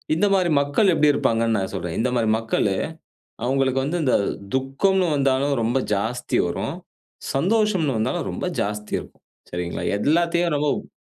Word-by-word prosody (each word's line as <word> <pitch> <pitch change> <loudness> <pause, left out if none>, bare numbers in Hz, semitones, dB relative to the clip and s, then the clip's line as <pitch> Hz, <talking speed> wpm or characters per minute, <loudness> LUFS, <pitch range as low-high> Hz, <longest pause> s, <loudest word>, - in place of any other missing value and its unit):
இந்த 205 +5 +2
மாரி 185 -3 +2
மக்கள் 160 +8 +2
எப்டி 150 -2 +4
இருப்பாங்கன்னு 115 -3 +1
நான் 95 0 -3
சொல்றேன். 85 -3 -4
இந்த 125 +2 +1
மாரி 110 -2 +1
மக்களு, 110 -3 0 0.7
அவுங்களுக்கு 135 0 +1
வந்து 160 +6 -1
இந்த 130 - +3 0.4
துக்கம்னு 175 +8 +1
வந்தாலும் 140 0 +1
ரொம்ப 120 +4 +1 0.2
ஜாஸ்தி 115 +5 -1
வரும். - - -3 0.6
சந்தோஷம்னு 185 - +1
வந்தாலும் 110 - -1
ரொம்ப - - -4 0.2
ஜாஸ்தி 105 +1 -4
இருக்கும். - - -17 0.3
சரிங்களா? 90 0 -3
எல்லாத்தையும் 170 +3 +2
ரொம்ப 145 0 -1
135 Hz, 140 wpm, -23 LUFS, 115-170 Hz, 0.7 s, எப்டி